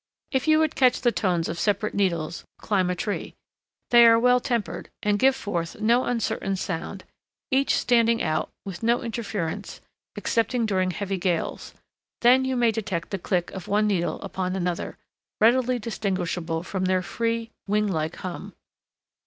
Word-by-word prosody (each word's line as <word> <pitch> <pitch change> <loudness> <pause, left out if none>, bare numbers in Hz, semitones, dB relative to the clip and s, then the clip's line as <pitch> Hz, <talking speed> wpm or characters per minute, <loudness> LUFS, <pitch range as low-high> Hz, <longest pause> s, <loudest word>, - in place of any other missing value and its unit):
If 265 +1 0
you 310 0 +6
would 315 -1 +2
catch 255 -2 +3
the 240 - +3
tones 180 -7 0
of 165 - -4
separate 205 0 0
needles, 170 -5 -1
climb 190 -4 0
a 180 - 0
tree. 205 +3 -4 0.6
They 235 -1 +8
are 230 0 +7
well 250 +2 +4
tempered, 240 -4 -3
and 205 0 +2
give 265 +3 +4
forth 180 -8 -4
no 235 +4 +3
uncertain 225 -4 -1
sound, 185 +1 -4 0.5
each 270 +1 +3
standing 230 -1 +3
out, 155 -6 -1 0.2
with 190 -3 -7
no 235 +1 +2
interference 210 -7 -4 0.4
excepting 230 +1 0
during 185 -3 +1
heavy 195 +1 -3
gales; 175 -2 -2 0.5
then 255 +2 +5
you 260 0 -1
may 240 -2 +3
detect 190 -6 -3
the 195 - -2
click 175 -1 -1
of 190 -3 -8
one 210 +1 +2
needle 175 -6 0
upon 190 -1 -3
another, 180 -2 -3 0.4
readily 245 +3 +4
distinguishable 180 -7 -2
from 185 0 -2
their 185 0 +1
free, 230 +2 -2 0.2
wing 210 +1 +2
like 160 -4 -2
hum. 180 -2 -7
205 Hz, 160 wpm, -25 LUFS, 180-235 Hz, 0.6 s, They